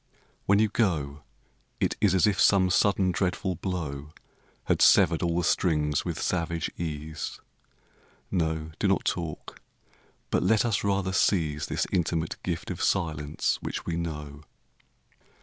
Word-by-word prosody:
When 100 - +5
you 110 +1 +4
go 80 - -1 0.6
It - - 0
is 95 -3 +4
as 90 - +4
if 105 -2 +1
some 95 -2 +4
sudden, 95 -1 +3
dreadful 90 +1 -1
blow 75 -6 -4 0.5
Had - - 0
severed 85 -4 +5
all 85 -1 0
the 90 - +1
strings 75 -6 +1
with - - -4
savage 85 -2 -1
ease. 80 -1 -5 0.9
No, 80 -3 -1
do - - +1
not - - +1
talk; 80 -3 -4 0.7
but - - +2
let 110 +1 +3
us 110 -5 0
rather 100 -2 0
seize 75 -7 +1
This - - -1
intimate 85 -2 -1
gift 85 +1 -4
of 90 - -5
silence 75 -5 0
which - - -5
we 85 - -2
know. 75 -4 -5
85 Hz, 140 wpm, -27 LUFS, 75-95 Hz, 0.9 s, When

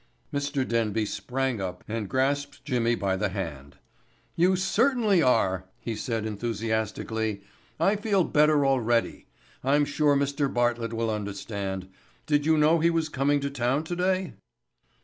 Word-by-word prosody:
Mr. 140 -2 -1
Denby 115 -2 0
sprang 130 0 -2
up 90 -2 -5
and 110 -2 -3
grasped 140 +2 -1
Jimmy 120 -4 +1
by 95 -3 0
the 105 +2 -1
hand. 80 -8 -6 0.6
"You 180 +3 +3
certainly 210 +1 +2
are," 95 - +2
he 115 - -4
said 115 0 -3
enthusiastically. 110 -1 -2 0.4
"I 195 +6 +3
feel 200 -3 +2
better 150 -2 +3
already. 120 -4 +1 0.4
I'm 145 +3 +3
sure 145 0 +2
Mr. 140 0 0
Bartlett 120 -1 0
will 115 0 -1
understand. 100 -2 -4 0.4
Did 145 -1 +1
you 160 -1 +4
know 155 +2 +4
he 165 +2 +3
was 165 -2 0
coming 145 0 +1
to 140 0 -2
town 135 +2 0
today?" 180 +2 -1
130 Hz, 140 wpm, -27 LUFS, 110-150 Hz, 0.6 s, you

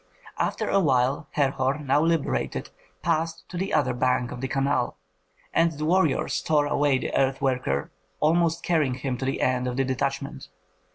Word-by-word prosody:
After - - -1
a 200 - +3
while 135 -2 +2
Herhor, 135 -1 +1
now 145 0 +1
liberated, 165 -2 -1 0.3
passed 165 -1 -1
to - - -8
the 190 +3 -2
other 150 -4 +2
bank 125 0 +1
of 125 - -7
the 130 - -1
canal, 135 -1 0 0.6
and 165 0 +3
the 150 +1 -4
warriors 165 -3 +2
tore 150 -2 +2
away 145 -1 +2
the - - -4
earth 135 0 +2
worker, 125 - -1 0.3
almost 165 +1 +2
carrying 150 -7 +1
him 130 -1 -3
to 130 - -2
the 135 - -1
end 125 0 +1
of 125 0 -3
the 135 - +3
detachment. 135 +1 -3
140 Hz, 170 wpm, -25 LUFS, 130-160 Hz, 0.6 s, a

